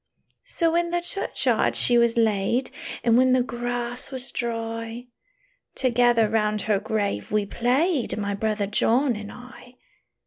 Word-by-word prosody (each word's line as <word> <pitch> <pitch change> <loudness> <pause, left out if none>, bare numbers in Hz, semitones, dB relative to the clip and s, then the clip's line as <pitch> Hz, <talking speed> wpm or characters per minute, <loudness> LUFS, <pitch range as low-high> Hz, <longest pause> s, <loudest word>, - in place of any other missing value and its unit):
"So 330 -2 0
in 340 0 +1
the 345 0 0
churchyard 265 - 0
she 245 - +5
was 235 -1 +3
laid; 225 +3 +1 0.3
And, 235 0 +4
when 255 0 +4
the 255 -1 +3
grass 245 +1 -4
was 260 -1 -7
dry, 230 0 -4 0.7
Together 240 -3 +3
round 210 -1 0
her 210 -2 +1
grave 200 - -2
we 210 -1 +1
played, 255 - 0
My 200 -1 -2
brother 210 0 -1
John 240 +5 +1
and 210 0 -8
I. 250 0 -14
235 Hz, 140 wpm, -24 LUFS, 215-255 Hz, 0.7 s, she